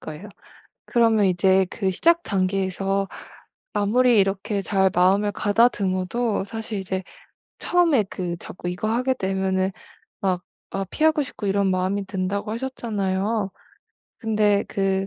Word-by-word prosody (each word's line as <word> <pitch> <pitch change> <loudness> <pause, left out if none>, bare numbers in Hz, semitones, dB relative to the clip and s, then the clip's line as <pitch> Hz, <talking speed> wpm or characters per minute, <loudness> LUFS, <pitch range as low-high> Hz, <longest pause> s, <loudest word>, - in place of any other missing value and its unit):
거예요. 155 +7 -8 0.6
그러면 225 -4 +3
이제 190 +1 +3
그 195 -4 -1
시작 335 - +3
단계에서 195 0 0 0.6
아무리 225 +3 +3
이렇게 195 +1 0
잘 190 +1 +2
마음을 195 +4 +3
가다듬어도 205 0 +1
사실 220 +1 -5
이제 190 0 -3 0.6
처음에 335 -10 +3
그 175 -2 -3
자꾸 175 0 -6
이거 180 +4 -3
하게 250 +3 +1
되면은 190 0 0 0.5
막 185 -2 0 0.3
아 195 0 -2
피하고 310 - +2
싶고 230 - -8
이런 195 0 +2
마음이 185 +2 0
든다고 195 +2 -3
하셨잖아요? 215 -4 -2 0.7
근데 210 -3 +2
그 195 0 0
195 Hz, 280 characters per minute, -23 LUFS, 190-220 Hz, 0.7 s, 그러면